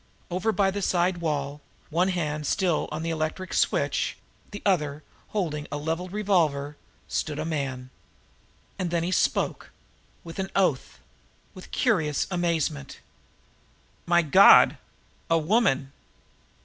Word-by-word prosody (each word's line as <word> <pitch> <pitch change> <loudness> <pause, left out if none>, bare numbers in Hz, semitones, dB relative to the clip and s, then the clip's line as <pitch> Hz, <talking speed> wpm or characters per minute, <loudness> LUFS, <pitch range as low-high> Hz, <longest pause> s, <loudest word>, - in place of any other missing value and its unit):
Over 185 +5 0
by 195 -1 +2
the 200 +1 -4
side 180 -1 +1
wall, 145 -3 -3 0.3
one 175 +4 +2
hand 155 -5 -2
still 180 -5 0
on 155 +1 -4
the 165 - -2
electric 160 +4 -3
light - - -3
switch, - - 0 0.3
the 205 - -9
other 150 -6 0 0.2
holding 155 -8 -3
a 145 - -2
leveled 165 +4 -3
revolver, 165 -9 +1 0.3
stood 150 -1 -2
a 155 - -3
man. 135 -5 -4 0.9
And 180 - -1
then 170 0 0
the 175 - -1
man - - -1
spoke - - 0 0.5
with 165 +2 -9
an 190 0 -2
oath 180 -9 +1 0.6
with 185 - -12
curious 160 - +1
amazement: 165 -5 -1 1.1
"My 175 0 +4
God 175 +6 +7 0.5
a 165 - +4
woman!" 155 - +1
165 Hz, 135 wpm, -26 LUFS, 150-185 Hz, 1.1 s, God